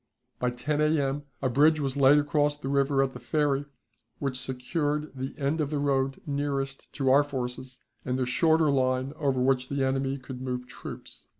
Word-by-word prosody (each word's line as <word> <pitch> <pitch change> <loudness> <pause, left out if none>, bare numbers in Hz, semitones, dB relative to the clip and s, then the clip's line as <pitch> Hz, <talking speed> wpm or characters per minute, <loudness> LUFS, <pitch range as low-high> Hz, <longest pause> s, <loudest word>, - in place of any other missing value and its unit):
By 125 - +1
10 145 +5 -2
A.M. 145 -2 +1 0.2
a 130 - +2
bridge 150 +5 +4
was 135 -2 -1
laid 140 +1 +6
across 145 0 +1
the 135 -2 -5
river 140 0 +2
at 135 -1 -2
the 125 - -8
ferry, 145 +2 0 0.5
which 135 -3 -2
secured 145 +4 -2
the 130 +1 -5
end 150 +3 0
of 145 - -1
the 150 - -1
road 135 -1 0
nearest 140 -1 -3
to 135 -2 +1
our 140 +2 +6
forces 130 -2 -5 0.3
and 125 0 -1
the 130 - 0
shorter 160 +4 +3
line 130 0 +1
over 140 -4 0
which 130 0 +1
the 140 -1 0
enemy 135 +1 0
could 130 -1 -9
move 125 -1 -3
troops. 125 - -10
135 Hz, 185 wpm, -28 LUFS, 130-145 Hz, 0.5 s, laid